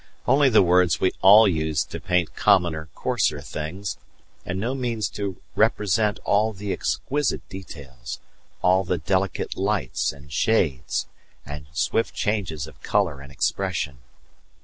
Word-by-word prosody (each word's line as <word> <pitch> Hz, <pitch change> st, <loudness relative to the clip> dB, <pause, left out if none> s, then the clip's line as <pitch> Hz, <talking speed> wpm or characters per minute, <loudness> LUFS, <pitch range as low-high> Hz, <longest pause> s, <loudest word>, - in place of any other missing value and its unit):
only 135 Hz, +2 st, +5 dB
the 110 Hz, -5 st, +6 dB
words 90 Hz, -1 st, +3 dB
we 95 Hz, -, +2 dB
all 105 Hz, +3 st, +8 dB
use 80 Hz, -4 st, 0 dB
to -, -, -7 dB
paint 90 Hz, -2 st, 0 dB
commoner, 85 Hz, -6 st, +2 dB
coarser 75 Hz, -, 0 dB
things, 80 Hz, +8 st, -5 dB, 0.4 s
and 90 Hz, +2 st, -4 dB
no 115 Hz, +6 st, -1 dB
means 120 Hz, -6 st, -1 dB
to 100 Hz, -3 st, -5 dB, 0.2 s
represent 105 Hz, +1 st, +2 dB
all 110 Hz, +2 st, +2 dB
the 100 Hz, 0 st, -4 dB
exquisite 145 Hz, 0 st, -1 dB
details, 70 Hz, -10 st, -9 dB, 0.4 s
all 95 Hz, +1 st, +4 dB
the 90 Hz, -1 st, -1 dB
delicate 95 Hz, +3 st, -1 dB
lights, 95 Hz, -, 0 dB
and 70 Hz, 0 st, -14 dB
shades, 75 Hz, -, +1 dB, 0.4 s
and 75 Hz, 0 st, -8 dB
swift 100 Hz, +5 st, 0 dB
changes 95 Hz, -, -1 dB
of 80 Hz, -, -15 dB
colour 90 Hz, -9 st, 0 dB
and 70 Hz, 0 st, -12 dB
expression. 75 Hz, -3 st, -2 dB
95 Hz, 135 wpm, -24 LUFS, 80-105 Hz, 0.4 s, all